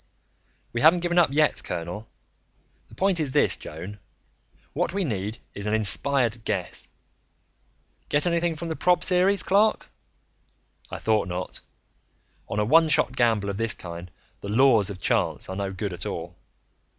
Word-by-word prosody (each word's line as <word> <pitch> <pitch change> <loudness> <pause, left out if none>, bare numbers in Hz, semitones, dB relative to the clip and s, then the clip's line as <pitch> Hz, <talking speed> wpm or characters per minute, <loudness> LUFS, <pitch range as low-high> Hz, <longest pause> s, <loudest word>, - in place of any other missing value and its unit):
"We 120 - -1
haven't 165 +3 +6
given 175 0 +2
up 165 -5 +4
yet, 150 +1 +2
colonel. 90 +6 -5 0.8
The - - -16
point 190 -2 +2
is 145 -4 -2
this, - - +3
Joan: 90 +7 -8 0.7
what - - -1
we 200 - 0
need 105 - -3 0.2
is 100 +1 -6
an 105 - +1
inspired 120 +2 +2
guess. 95 -5 -3 1.2
Get 145 +3 +2
anything 170 -1 +1
from 165 +2 -6
the 160 - -2
prob 180 +2 +2
series, 190 +2 +3
Clark? 210 +3 +2 1.0
I - - -5
thought 110 -2 +1
not. 90 0 -5 0.9
On 105 - -2
a 105 - +2
one 160 +6 +5
shot - - +2
gamble 110 -4 +1
of 100 - -6
this 115 -3 0
kind, 85 0 -8 0.3
the 100 - -7
'laws' 115 -3 +4
of 100 -2 -7
chance - - 0
are 95 - -5
no 100 0 -3
good 95 0 -4
at 90 - -4
all. - - -6
115 Hz, 160 wpm, -25 LUFS, 100-165 Hz, 1.2 s, haven't